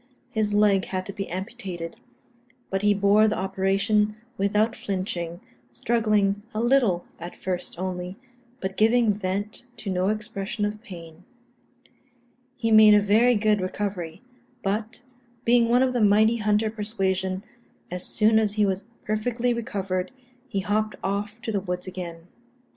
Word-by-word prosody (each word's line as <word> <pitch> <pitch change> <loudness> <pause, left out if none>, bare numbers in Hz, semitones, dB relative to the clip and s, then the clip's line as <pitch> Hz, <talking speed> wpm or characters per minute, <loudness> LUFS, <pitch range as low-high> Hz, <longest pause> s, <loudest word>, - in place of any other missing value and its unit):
His 215 -2 0
leg 205 -2 +3
had 185 -1 -3
to 200 - -6
be 195 -1 -5
amputated; 185 -3 -5 0.8
but 195 0 0
he 205 0 +4
bore 205 +2 +4
the 215 - 0
operation 195 +3 +1 0.2
without 210 +2 +1
flinching, 180 -3 -4 0.3
struggling 205 - +1
a - - 0
little 235 -7 +3
at 175 +1 -8
first 180 -2 -3
only, 180 +1 -4 0.4
but 190 0 -4
giving 225 0 +4
vent 205 +4 -3
to 200 - -4
no 185 0 +1
expression 210 0 -2
of 210 +1 -4
pain. 170 -5 -11 1.3
He 225 -2 0
made 215 -1 +8
a - - +7
very 220 +4 +4
good 210 -1 +2
recovery; 185 -1 -4 0.4
but, 215 +4 -2 0.4
being 235 0 +4
one 245 +2 +5
of 255 -1 +1
the 245 - +1
mighty 215 +3 +5
hunter 215 0 +1
persuasion, 190 -3 -2 0.5
as 180 0 -4
soon 220 +1 +3
as 210 -2 0
he 210 -1 +2
was 195 +1 -2 0.2
perfectly 235 +3 0
recovered, 195 -6 -2 0.4
he 200 -6 -2
hopped 215 +2 0
off 205 +3 -2
to 225 - -2
the 200 -2 0
woods 180 -1 -3
again. 175 -3 -7
205 Hz, 145 wpm, -25 LUFS, 190-215 Hz, 1.3 s, made